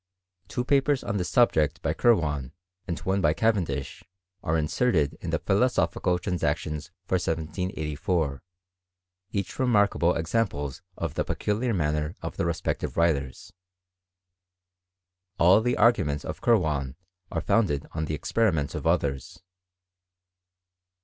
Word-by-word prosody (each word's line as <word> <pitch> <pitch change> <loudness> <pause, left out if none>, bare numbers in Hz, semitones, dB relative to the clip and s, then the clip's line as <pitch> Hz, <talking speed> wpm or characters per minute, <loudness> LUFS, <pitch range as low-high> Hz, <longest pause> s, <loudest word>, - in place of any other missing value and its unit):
Two 125 +5 -3
papers 140 0 +2
on 100 - -2
this 90 -2 -2
subject 80 - +3
by - - +1
Kirwan, 75 - +1 0.3
and 85 -3 -2
one 95 +1 0
by 75 -3 +3
Cavendish, 85 - -1 0.4
are 80 +1 0
inserted 75 - +1
in - - -4
the - - +1
Philosophical 90 -1 +1
Transactions 85 -4 -2 0.2
for 95 - +1
1784, 80 -2 -2 0.9
each 100 -3 -4
remarkable 105 -8 +3
examples 80 - -1 0.2
of 85 -4 -3
the - - 0
peculiar 110 +4 -1
manner 75 -1 -1
of - - -5
the - - -1
respective 85 - -2
writers; 70 -6 0 1.8
All 95 +5 +6
the 125 +2 0
arguments 75 -11 +3
of - - -6
Kirwan 75 - +1 0.4
are 80 - -1
founded 80 -5 +1
tOL 80 0 -2
the 75 - -2
experiments 80 -6 0
^f 75 - -3
others. 70 -5 -1
85 Hz, 120 wpm, -26 LUFS, 75-105 Hz, 1.8 s, All